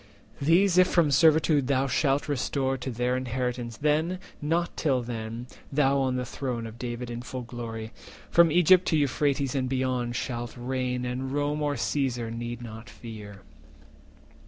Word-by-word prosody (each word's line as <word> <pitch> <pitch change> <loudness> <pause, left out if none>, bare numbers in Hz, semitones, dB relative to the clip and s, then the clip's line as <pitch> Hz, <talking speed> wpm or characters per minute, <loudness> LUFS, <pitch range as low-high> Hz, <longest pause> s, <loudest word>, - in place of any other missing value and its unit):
380 140 - -4 0.2
These 190 -3 +2
if 185 - +6
from 165 -6 +3
servitude 155 -1 +4
thou 135 -1 +2
shalt 135 +2 +1
restore 135 -1 0
To 130 0 -5
their 125 +1 0
inheritance, 125 -2 -3
then, 155 +5 +1 0.2
nor 165 +4 +1
till 130 -5 +1
then, 115 0 -5 0.3
Thou 140 -1 +3
on 130 -1 +1
the 125 0 -2
throne 120 -2 -4
of 115 +1 -9
David 120 0 -4
in 120 0 -5
full 125 0 -6
glory, 115 -2 -6 0.4
From 170 -2 +6
Egypt 180 +2 +5
to 160 - +3
Euphrates 140 -1 +1
and 130 -2 -1
beyond, 130 -2 -1
Shalt 120 -1 -4
reign, 125 0 -2
and 130 +2 -3
Rome 145 +1 -1
or 145 -1 0
Caesar 125 -3 -1
not 115 - -5
need 120 -2 -7
fear." 105 -4 -10
130 Hz, 160 wpm, -27 LUFS, 120-145 Hz, 0.4 s, if